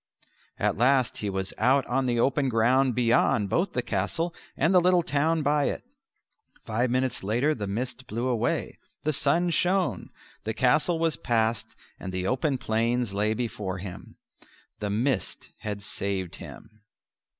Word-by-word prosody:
At - - 0
last 130 +1 +3
he 105 - -2
was 95 0 -3
out 135 +1 +3
on 130 +1 0
the 120 -1 +1
open 135 +2 +2
ground 125 +2 +3
beyond 115 -4 +2
both 185 +4 +1
the 125 - -1
castle 110 - -1 0.2
and 165 +7 +2
the 180 - +6
little 180 0 +4
town 155 +2 +1
by 145 0 +2
it. - - -2 0.8
Five 120 +3 0
minutes 130 -2 0
later 120 +10 +1
the 105 -7 -4
mist 125 +5 -4
blew 115 +4 -2
away; 120 -1 -1 0.2
the 155 - 0
sun 165 +6 +2
shone; 175 - +1 0.3
the 110 +1 -3
castle 150 +8 +3
was 165 -1 +1
passed, 115 -2 0 0.2
and 95 - -6
the 90 0 -2
open 130 +5 0
plains 115 -1 0
lay 105 +2 +1
before 105 -5 -3
him. 90 -1 -9 0.6
The 105 - -2
mist 110 +1 -1
had 105 -1 -5
saved 100 -3 -3
him. 110 -1 -12
125 Hz, 155 wpm, -27 LUFS, 105-140 Hz, 0.8 s, the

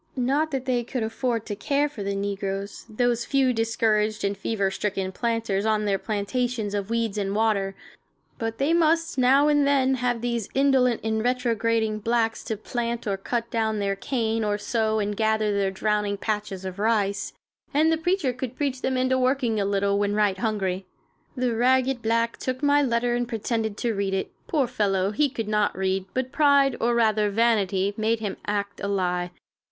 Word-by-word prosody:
Not 275 +5 +1
that 270 -3 -3
they 245 -2 +1
could 245 0 -3
afford 225 0 -2
to 205 - -4
care 280 +7 +1
for 285 -8 -9
the 200 0 -2
negroes, 195 0 -4
those 240 +1 +1
few 270 -2 +2
discouraged 220 -2 +1
and 200 0 0
fever 200 -2 -1
stricken 190 -1 -2
planters 225 -2 -1
on 215 -1 +1
their 195 -1 +1
plantations 220 +1 -2
of 200 0 -2
weeds 230 -3 -1
and 195 0 -2
water, 205 -3 +1 0.6
but 225 0 -3
they 285 +4 +1
must, 330 -3 +2
now 270 +3 +5
and 290 -1 +3
then, 265 -2 +3
have 245 -2 -1
these 235 -3 -2
indolent 265 -3 +3
and 220 0 0
retrograding 230 -3 0
blacks 225 +1 0
to 220 -3 -3
plant 235 +2 -3
or 200 -2 0
cut 230 +4 -3
down 220 -1 0
their 200 -1 0
cane, 225 0 -1
or 205 -1 0
sow 220 0 0
and 205 -1 -1
gather 220 -1 +1
their 200 -1 +1
drowning 205 +1 -1
patches 205 -3 -3
of 185 +1 -6
rice, 205 -2 0 0.4
and 310 +2 +3
the - - +4
preacher 320 -4 0
could 255 0 -5
preach 270 -3 -2
them 260 - 0
into 260 0 +2
working 255 -4 +1
a 200 - +1
little, 200 0 +1
when 205 0 0
right 205 -3 +1
hungry. 195 -4 -1 0.5
The 250 -2 0
ragged 255 +1 +2
black 230 +1 0
took 255 +2 -4
my 290 0 +4
letter 240 -2 +1
and 240 0 -1
pretended 220 -1 -2
to 235 -2 -1
read 195 -1 -1
it. 190 - -3 0.2
Poor 295 -5 +2
fellow, 200 -5 0
he 285 +7 +2
could 230 -5 -4
not 210 -2 +1
read, 190 0 0
but 260 0 -1
pride, 280 -3 +4
or 235 +1 +1
rather 215 -2 +3
vanity, 200 -3 +1
made 225 +1 +1
him 205 -3 -4
act 200 -1 -2
a 200 - -2
lie. 180 -3 0
225 Hz, 185 wpm, -25 LUFS, 205-250 Hz, 0.6 s, now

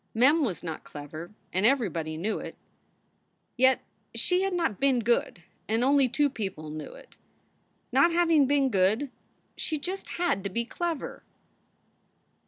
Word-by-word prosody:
Mem 285 +7 +5
was 200 -10 -2
not 160 -2 -5
clever, 155 +3 -8 0.2
and 185 - +1
everybody 180 - +1
knew 205 +7 -1
it. - - -7 1.0
Yet 260 +1 +4 0.3
she 360 0 +2
had 390 0 0
not 330 - 0
been 275 -2 +3
good, 230 -6 0 0.2
and 225 +2 +1
only 275 -1 +4
two 290 +4 +2
people 190 - -5
knew 155 0 -7
it. - - -16 0.7
Not 340 - +5
having 330 -5 +4
been 280 -1 +3
good, 210 +8 +2 0.4
she 315 - -2
just 370 +6 -4
had 345 - 0
to 200 - -2
be 235 +5 -1
clever. 335 +3 -4
245 Hz, 145 wpm, -28 LUFS, 190-295 Hz, 1.0 s, Mem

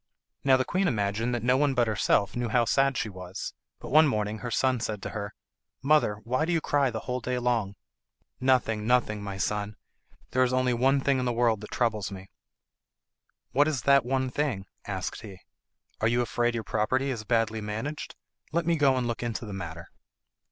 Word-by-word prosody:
Now 135 -1 +5
the 130 - 0
queen 185 +1 +1
imagined 110 - 0
that 115 - -3
no 125 +1 +3
one 140 -1 +2
but 120 -1 +3
herself 105 -2 +1
knew 120 -1 -1
how 120 +1 +3
sad 135 +3 +2
she - - -1
was, 95 -1 -7 0.3
but - - -9
one 155 +2 +7
morning 105 -4 -1
her 120 - -5
son 130 +1 +1
said 110 -2 -3
to - - -4
her, 100 -1 -5 0.5
"Mother, 150 -7 +3
why 130 +6 0
do 170 - 0
you 165 - +2
cry 145 -3 +1
the 110 -2 -4
whole 125 0 -3
day 125 +1 -2
long?" 120 -5 0 0.6
"Nothing, 120 -5 +1
nothing, 115 -4 +2
my 100 -1 -5
son; 105 +2 -2 0.6
there 130 - +2
is 130 0 +3
only 130 -1 +2
one 135 +3 +3
thing 135 -1 +2
in 125 - -1
the 120 - +1
world 115 -3 +1
that 105 - -9
troubles 110 -5 0
me." 95 0 -10 1.2
"What 145 +3 +4
is 145 -6 -1
that 140 -1 +5
one 130 +1 -1
thing?" 125 -10 -1 0.2
asked 95 -2 -4
he. 100 -4 -10 0.6
"Are 110 - +2
you 120 +2 +2
afraid 120 0 0
your 115 - -2
property 125 +5 0
is 115 -4 -4
badly 110 -1 0
managed? 110 +8 -5 0.4
Let 170 +1 0
me 170 0 +2
go 140 -3 +4
and 125 - 0
look 115 -1 -3
into 120 -1 -3
the 105 - -7
matter." 85 -3 -7
120 Hz, 200 wpm, -28 LUFS, 105-130 Hz, 1.2 s, one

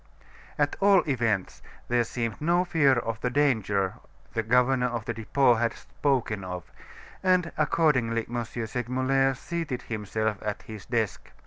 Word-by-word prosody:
At 145 -1 +1
all 195 -3 +5
events, 115 -8 0 0.3
there 120 0 +2
seemed 115 0 -4
no 175 +3 +2
fear 155 -6 +4
of 115 -2 -2
the 125 - 0
danger 110 -9 +1 0.3
the 115 - 0
governor 125 +3 +3
of 120 -3 -4
the 120 - -2
Depot 120 +3 +3
had 115 0 0
spoken 125 -8 -1
of, 90 -1 -7 0.5
and 185 -2 +2
accordingly 130 -8 +2
M. 120 0 -2
Segmuller 125 +4 0
seated 155 -2 -4
himself 110 -1 -2
at 105 -1 -4
his 110 -3 -10
desk. 110 -4 -2
120 Hz, 140 wpm, -27 LUFS, 110-140 Hz, 0.5 s, all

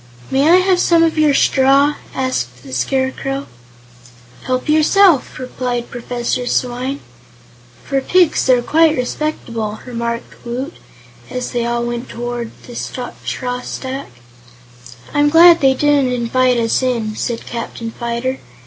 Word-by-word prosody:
"May 275 +4 +3
I 345 - +7
have 370 0 +3
some 335 -2 +4
of 325 -1 +1
your 300 -2 +4
straw?" 275 +2 +4 0.2
asked 125 - -3
the 135 -2 -11
Scarecrow. 265 - -1 1.0
"Help 255 +2 -1
yourself," 315 +1 +4
replied 250 -1 -4
Professor 245 0 -3
Swyne. 255 +3 -2 0.8
"For 275 -1 -1
pigs, 355 0 +2
they're 250 -2 +4
quite 315 +2 +3
respectable," 235 -5 -3
remarked 235 -1 -5
Woot, 255 +6 -4 0.6
as 250 0 -4
they 235 -1 -1
all 235 0 -1
went 240 0 -4
toward 240 -1 -4 0.2
the 240 - -10
straw 250 0 -5
stack. 265 +2 -6 1.0
"I'm 290 0 +3
glad 335 +2 +7
they 265 -1 +4
didn't 285 -2 +2
invite 250 +1 +1
us 230 +1 +1
in," 230 -4 -1
said 235 +1 -3
Captain 230 -1 -6
Fyter. 235 +3 -3
255 Hz, 130 wpm, -17 LUFS, 240-285 Hz, 1.0 s, I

